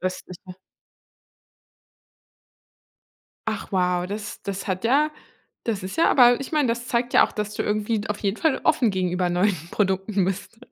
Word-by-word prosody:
östliche? 185 0 -6 2.9
Ach - - -4
wow, 180 -1 +1
das 210 +1 -6
das 195 -1 -5
hat 185 +1 -3
ja 290 +6 +3 0.5
das 215 -4 -2
ist 185 +1 -6
ja 330 - +4
aber 245 -1 +6
ich 275 - -6
meine, 300 -4 +2
das 235 +1 -2
zeigt 245 0 -1
ja - - +7
auch, - - -14
dass 210 0 -4
du - - -1
irgendwie 215 +1 0
d 205 - -7
auf 210 0 -2
jeden 200 0 -1
Fall 315 0 +1
offen 255 -8 +3
gegenüber 180 -1 0
neuen 185 +3 +2 0.2
Produkten 190 0 0
bist. 195 +4 -4
205 Hz, 160 wpm, -24 LUFS, 185-235 Hz, 2.9 s, ja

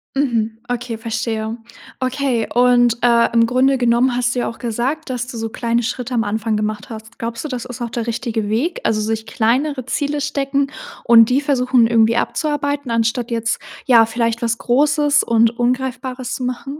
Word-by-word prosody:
Mhm, 230 -5 0
okay, 245 -1 -3
verstehe. 225 0 -3 0.4
Okay, 255 -3 0
und, 245 -1 +4
äh, 235 -1 +4
im 230 -1 +5
Grunde 260 +3 +2
genommen 245 +1 +2
hast 245 0 0
du - - 0
ja - - -1
auch 230 - -10
gesagt, 250 +7 -2
dass 250 -1 -3
du 245 -2 -7
so 225 - -3
kleine 235 +1 -1
Schritte 250 +1 -4
am 230 -2 +1
Anfang 220 +1 -1
gemacht 210 -1 -3
hast. 220 0 -10
Glaubst 230 +4 -5
du, - - -1
das 250 -4 -4
ist 250 0 -8
auch 235 - -2
der 235 0 -4
richtige 230 -2 -2
Weg? 275 +11 -1
Also, 215 -1 +1
sich 220 +1 -2
kleinere 255 +5 0
Ziele 290 +2 -1
stecken 280 -1 -1 0.4
und 230 -2 +7
die 255 +2 +3
versuchen 255 -4 +2
irgendwie 230 0 +3
abzuarbeiten, 285 -3 -1
anstatt 230 +1 0
jetzt 230 0 -1 0.3
ja, 230 -3 +6
vielleicht 230 0 -1
was 235 0 0
großes 290 +4 +2
und 230 0 +3
Ungreifbares 255 0 -2
zu 255 - -5
machen? 270 +3 -4
240 Hz, 180 wpm, -19 LUFS, 230-260 Hz, 0.4 s, und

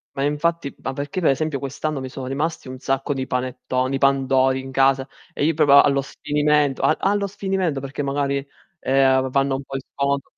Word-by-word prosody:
Ma 135 - -3
infatti, 150 +1 0
ma - - -2
perché 145 +7 -4
pe 155 - +4
esempio 155 +1 -1
quest'anno 140 +2 -3
mi 130 - -5
sono 130 0 -7
rimasti 145 +3 -3
un 130 0 -7
sacco 135 +2 -1
di 130 - -2
panettoni, 130 0 -2
di 135 - -1
pandori 135 -1 +2
in 130 0 -8
casa 135 0 +2 0.3
e - - -2
io 160 +1 +2
proprio 140 -2 +7
allo 140 -1 +2
sfinimento 150 -1 0
a 155 - +4
allo 200 +1 +1
sfinimento, 190 -6 -2
perché 135 +1 -5
magari, 140 0 0 0.4
ehm, 135 0 +3
va 130 - -3
vanno 135 +1 +1
un 135 - -5
po' 135 - -13
in 135 - -3
sconto 140 0 -1
140 Hz, 200 wpm, -22 LUFS, 135-150 Hz, 0.4 s, proprio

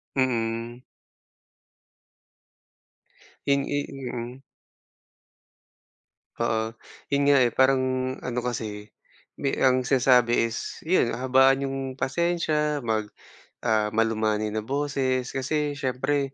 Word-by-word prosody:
Mm. 120 -2 -1 2.7
Hin 140 0 +3
i 145 - 0
mm. 125 -2 -6 2.0
Oo, 110 -1 -1 0.3
'yun 140 0 +2
nga, 140 0 +6
eh, 120 - +4
parang 130 +2 +3 0.4
ano 125 -1 -2
kasi 105 -3 -4 0.5
mi 140 - 0
ang 130 -1 +3
sinasabi 125 -3 +4
is 115 - -5
'yun 160 -9 +2
habaan 130 +2 +3
yung 135 0 -3 0.2
pasensya, 150 -1 0
mag, 110 -2 -1 0.5
ah, 110 -2 +1
malumanay 110 -1 +1
na 110 0 -3
boses 135 -2 -1
kasi 145 +2 -1
siyempre 135 +1 -1
130 Hz, 95 wpm, -25 LUFS, 115-140 Hz, 2.7 s, nga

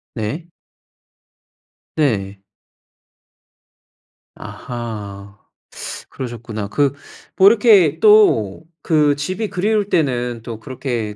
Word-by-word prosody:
네. 135 +10 -4 1.5
네. 100 -10 -1 2.0
아하. 105 -4 -8 0.7
그러셨구나. 115 -4 -6
그 140 +3 +1 0.4
뭐 190 0 +6
이렇게 205 - +5
또 205 - +4 0.2
그 150 -3 +2
집이 185 +9 -3
그리울 205 +2 0
때는 125 - -1
또 115 -1 -8
그렇게 120 -4 -4
130 Hz, 145 characters per minute, -19 LUFS, 110-175 Hz, 2.0 s, 뭐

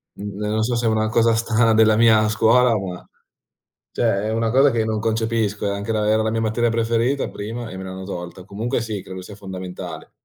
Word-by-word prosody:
Uhm, 100 0 -7
non 105 +1 -1
so 120 +1 0
se 115 0 -1
è - - +3
una 110 0 +1
cosa 115 +1 +3
strana 115 0 +2
della 110 -1 +5
mia 110 -1 +5
scuola, 115 +2 +4
ma 90 -3 -6 0.9
cioè 110 -4 +1
è 110 - -1
una 115 0 0
cosa 135 +4 +5
che 115 -3 0
non 110 -1 -1
concepisco. 110 -2 -1
È - - 0
anche 100 +3 -3
la 105 -1 0
era 110 +1 +3
la 110 - 0
mia 115 - -1
materia 115 +2 +1
preferita 115 +4 0
prima 115 +3 -6
e 95 - -8
me 95 - -7
l'hanno 95 0 -7
tolta. 90 -1 -7
Comunque 110 +5 -2
sì, 110 -4 -4
credo 95 0 -8
sia 100 +2 -11
fondamentale. 95 -2 -8
110 Hz, 215 wpm, -21 LUFS, 100-115 Hz, 0.9 s, della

